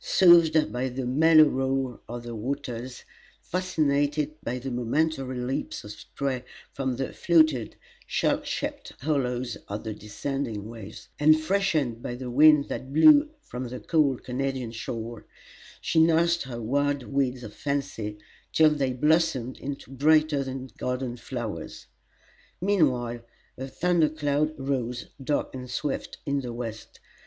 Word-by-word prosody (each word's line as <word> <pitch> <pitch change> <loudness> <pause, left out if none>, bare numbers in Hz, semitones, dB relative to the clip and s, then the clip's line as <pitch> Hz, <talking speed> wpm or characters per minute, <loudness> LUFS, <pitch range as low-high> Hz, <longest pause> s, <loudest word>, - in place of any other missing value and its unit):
Soothed 170 -4 +5
by 125 +2 -1
the 130 +1 -4
mellow 155 +5 +6
roar 135 -3 0
of 120 0 -6
the 120 0 -6
waters, 125 +1 -5 0.4
fascinated 150 -4 0
by 120 +2 -2
the 130 +1 -5
momentary 130 +2 -1
leaps 130 +4 -3
of 105 - -8
spray 130 +3 -4 0.3
from 130 -2 -2
the 135 +2 -4
fluted, 155 -9 +3 0.3
shell - - +1
shaped - - -4
hollows 130 -4 -1
of 105 +1 -5
the 110 -1 -4
descending 105 +1 -4
waves, 110 -2 -10
and 155 +1 +6
freshened 155 - 0
by 120 -2 -4
the 125 0 -6
wind 150 +2 +6
that 130 - -5
blew 290 - +7
from 125 +1 -6
the 125 +1 -6
cool 150 -6 +2
Canadian 130 -1 -3
shore, 115 0 -6 0.5
she 165 - +1
nursed 170 +1 +3
her 120 -3 -6
wild 140 +4 0
weeds 130 -2 -1
of 105 -2 -8
fancy 140 -8 -3 0.3
till 155 -1 +5
they 135 -4 0
blossomed 150 -2 +1
into 140 -1 -6
brighter 150 +1 +3
than 130 -1 -6
garden 125 -1 -2
flowers. 110 - -6 0.7
Meanwhile 130 -12 +1 0.3
a 130 - -6
thunder 170 +2 +2
cloud 150 0 0
rose, 125 -3 -3
dark 145 +2 -1
and 125 -1 -7
swift, 135 +3 -3
in 140 0 0
the 120 -2 -5
west. 115 -2 -7
135 Hz, 140 wpm, -26 LUFS, 120-150 Hz, 0.7 s, blew